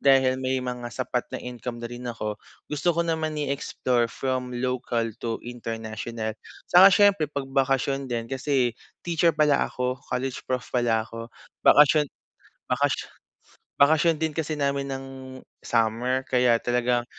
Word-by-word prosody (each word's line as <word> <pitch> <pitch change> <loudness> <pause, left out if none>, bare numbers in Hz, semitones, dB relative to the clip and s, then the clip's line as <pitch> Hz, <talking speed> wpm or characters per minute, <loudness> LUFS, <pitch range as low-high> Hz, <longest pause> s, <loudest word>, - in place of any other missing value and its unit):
dahil 130 -1 +4
may 130 0 0
mga 125 -1 -4
sapat 125 0 -2
na - - 0
income 125 -1 -6
na 120 - -4
rin 120 0 -6
ako, 110 -3 -4 0.3
gusto 160 +3 0
ko 170 - +2
naman 160 -2 -1
i-explore 135 -4 0
from 125 0 -3
local 125 -2 -1 0.2
to 115 -1 -2
international. 115 -1 -5 0.4
Saka 180 +2 +9
syempre 200 -5 +4
'pag 140 -2 -4
bakasyon 135 0 +1
din, 115 -2 -2
kasi 130 -2 +1 0.3
teacher 170 -1 +2
pala 150 -2 +3
ako, 125 +1 -3
college 130 +1 -2
prof 130 -1 -1
pala 115 -3 +2
ako, 115 +1 -8 0.3
bakasyon 150 0 +6 0.6
bakasyon - - 0 0.7
bakasyon 160 +3 +4
din 160 0 -1
kasi 155 0 -3
namin 140 -1 -1
ng 135 0 -5 0.5
summer. 120 +3 0
Kaya 125 -2 +4
talagang 120 0 +1
130 Hz, 140 wpm, -25 LUFS, 120-145 Hz, 0.7 s, Saka